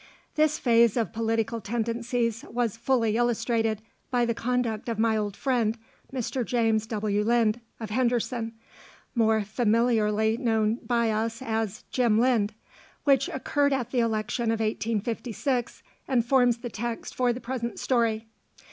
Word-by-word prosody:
This 305 Hz, 0 st, +2 dB
phase 235 Hz, -2 st, +4 dB
of 230 Hz, -1 st, -1 dB
political 225 Hz, 0 st, -1 dB
tendencies 230 Hz, +2 st, -1 dB
was 235 Hz, -3 st, -1 dB
fully 230 Hz, -2 st, +1 dB
illustrated 230 Hz, -2 st, 0 dB, 0.3 s
by 245 Hz, -1 st, +2 dB
the 235 Hz, -, 0 dB
conduct 235 Hz, -1 st, -1 dB
of 230 Hz, -, -2 dB
my 220 Hz, 0 st, +2 dB
old 205 Hz, -2 st, -2 dB
friend, 235 Hz, -4 st, +1 dB, 0.3 s
Mr. 255 Hz, 0 st, -2 dB
James 225 Hz, -2 st, +1 dB
W. 210 Hz, -1 st, 0 dB
Lynd 230 Hz, 0 st, +2 dB, 0.2 s
of 220 Hz, -2 st, -6 dB
Henderson, 235 Hz, -1 st, 0 dB, 0.6 s
more 220 Hz, -2 st, +3 dB
familiarly 220 Hz, 0 st, +2 dB
known 225 Hz, -2 st, +1 dB
by 235 Hz, -2 st, +2 dB
us 225 Hz, +1 st, -1 dB
as 220 Hz, -3 st, -2 dB
"Jim 235 Hz, -4 st, +3 dB
Lynd," 225 Hz, -4 st, +2 dB, 0.5 s
which 275 Hz, -2 st, +3 dB
occurred 285 Hz, +1 st, +1 dB
at 245 Hz, -3 st, -2 dB
the 255 Hz, -, +1 dB
election 230 Hz, +1 st, 0 dB
of 225 Hz, 0 st, +1 dB
1856, 230 Hz, +3 st, -2 dB, 0.2 s
and 245 Hz, -4 st, +2 dB
forms 245 Hz, -2 st, +4 dB
the 240 Hz, +1 st, -6 dB
text 235 Hz, +2 st, -4 dB
for 250 Hz, -1 st, +2 dB
the 240 Hz, -, -4 dB
present 235 Hz, -1 st, -4 dB
story. 230 Hz, -3 st, +1 dB
230 Hz, 140 wpm, -27 LUFS, 220-245 Hz, 0.6 s, phase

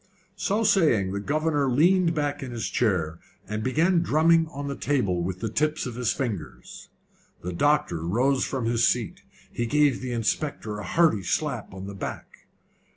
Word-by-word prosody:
So 210 Hz, +2 st, 0 dB
saying, 155 Hz, -, +3 dB
the 100 Hz, -, -2 dB
governor 145 Hz, +3 st, 0 dB
leaned 170 Hz, +5 st, +3 dB
back 145 Hz, -1 st, -1 dB
in 130 Hz, -, -5 dB
his 115 Hz, -3 st, -4 dB
chair, 85 Hz, -8 st, 0 dB, 0.3 s
and 105 Hz, +1 st, -3 dB
began 165 Hz, +9 st, +2 dB
drumming 165 Hz, +1 st, +3 dB
on 145 Hz, -2 st, -6 dB
the 140 Hz, -, -3 dB
table 100 Hz, -12 st, 0 dB
with 90 Hz, +1 st, -4 dB
the 115 Hz, -, -1 dB
tips 155 Hz, +7 st, 0 dB
of 125 Hz, -, -5 dB
his 125 Hz, 0 st, 0 dB
fingers. 100 Hz, -, -5 dB, 0.5 s
The 90 Hz, +1 st, -4 dB
doctor 145 Hz, -, +1 dB
rose 125 Hz, +10 st, +1 dB
from 130 Hz, -4 st, -2 dB
his 115 Hz, -1 st, +3 dB
seat. -, -, -1 dB, 0.3 s
He 120 Hz, -, -2 dB
gave 145 Hz, 0 st, +2 dB
the 130 Hz, -1 st, -4 dB
inspector 115 Hz, -2 st, -2 dB
a -, -, -6 dB
hearty 130 Hz, -, +2 dB
slap 125 Hz, -, -2 dB
on 95 Hz, 0 st, -8 dB
the 100 Hz, -, -7 dB
back. 95 Hz, -, -8 dB
130 Hz, 170 wpm, -25 LUFS, 105-150 Hz, 0.5 s, saying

